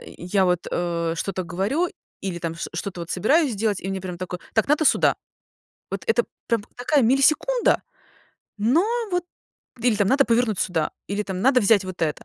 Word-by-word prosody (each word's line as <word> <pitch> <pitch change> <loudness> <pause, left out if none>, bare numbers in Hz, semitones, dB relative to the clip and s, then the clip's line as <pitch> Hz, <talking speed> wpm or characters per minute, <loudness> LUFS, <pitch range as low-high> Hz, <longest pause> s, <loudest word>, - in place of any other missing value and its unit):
я 190 +2 -1
вот, 180 -1 +2
э, 170 -1 -1
что-то 190 +2 -2
говорю 195 - -1 0.3
или, 185 -3 -4
там, 165 -1 -4
шт 165 - -5
что-то, 180 +1 -4
вот, 170 - -7
собираюсь 275 - +2
сделать 210 -1 -1
и 190 - -5
мне 195 0 -3
прям 180 -1 -6
такое: 180 -1 -5 0.2
"Так 220 +4 +2
надо 300 +2 +3
сюда". - - +4 0.8
Вот, - - -4
это 460 - +3 0.2
прям, 230 -3 +1
такая 265 +2 +2
миллисекунда, 305 - +3 0.8
но 250 - +3 0.3
вот. 355 -1 0 0.6
Или, 235 -2 +2
там, 205 -2 +2
надо 275 +1 +4
повернуть 230 -3 +1
сюда 165 -4 0 0.2
или, 200 +1 -1
там, 190 -1 -4
надо 255 +2 +4
взять 200 -2 +4
вот 185 -1 -7
это. 150 -2 -1
205 Hz, 180 wpm, -23 LUFS, 180-260 Hz, 0.8 s, сюда